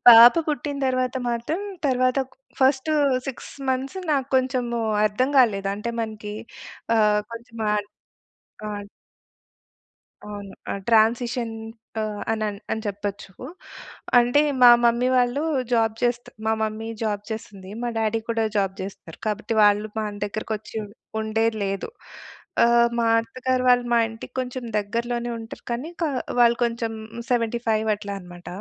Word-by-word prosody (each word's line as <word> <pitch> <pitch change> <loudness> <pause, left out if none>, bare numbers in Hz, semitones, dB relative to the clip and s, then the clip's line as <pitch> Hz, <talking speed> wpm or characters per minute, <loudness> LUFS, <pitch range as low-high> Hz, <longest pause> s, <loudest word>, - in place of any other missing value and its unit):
పాప 235 +3 +11
పుట్టిన 290 0 -2
తరువాత 255 0 0
మాత్రం 240 +10 -2 0.3
తరువాత 255 -1 +2
ఒక 260 - -26 0.3
ఫస్ట్ 265 +3 +3 0.4
6 270 - -6 0.2
మంత్స్ 270 +8 -2
నాకు 275 -2 0
కొంచెము 250 -2 0 0.2
అర్థం 215 +6 +1
గాలేదు. 200 -6 +3
అంటే 210 +3 -4
మనకి 210 -1 -6 0.6
ఆహ్, 210 -1 +4
కొంచెం 230 0 -10
మాట్ 210 -1 0 0.8
ఆడ్ 205 -1 -6 1.4
అవును. 205 -2 -8 0.2
ఆ! - - -1 0.2
ట్రాన్సిషన్ 235 +1 +2 0.5
ఆహ్, 210 -1 -3
అనన్ 215 -2 -1
అని 220 - -1
చెప్పొచ్చు. 200 -1 -4 0.9
అంటే 245 +4 +4 0.2
మా 245 - +10
మమ్మీ 235 +1 +3
వాళ్ళు 250 +2 +2 0.3
జాబు 225 -2 +2
చేస్తూ 240 0 0 0.2
మా 220 - +3
మమ్మీ 220 +1 -2
జాబు 210 -2 -1
చేస్తుంది. 210 -4 -7
మా 240 - -1
డ్యాడీ 225 0 +1
కూడా 225 -1 +1
జాబు 195 -2 +1
జేస్తారు. 190 -4 -9
కాబట్టి 215 +1 -2
వాళ్ళు 210 +1 +4
మన 210 -1 -3
దగ్గరకి 215 +2 -4
వచ్చి 210 - -15
ఉం - - -8 0.3
ఉండేది 220 +1 0
లేదు. 195 - -2 0.8
ఆహ్, 235 0 +5
మా 230 - +2
అత్తగారు 255 +2 -1
వాళ్ళు 245 -1 +4
మా 235 - +5
ఇంటికి 225 0 -10
కొంచెం 255 0 -5 0.2
దగ్గరలోనే 235 +3 -2
ఉంటారు. 225 0 -9
కానీ 255 +8 -3
కా 315 - +1 0.3
వాళ్ళు 235 0 +5
కొంచెం 230 -1 -2 0.4
75 230 -2 +1
అట్లా 200 -1 -6
అనమాట. 175 -1 -13
230 Hz, 135 wpm, -24 LUFS, 210-245 Hz, 1.4 s, పాప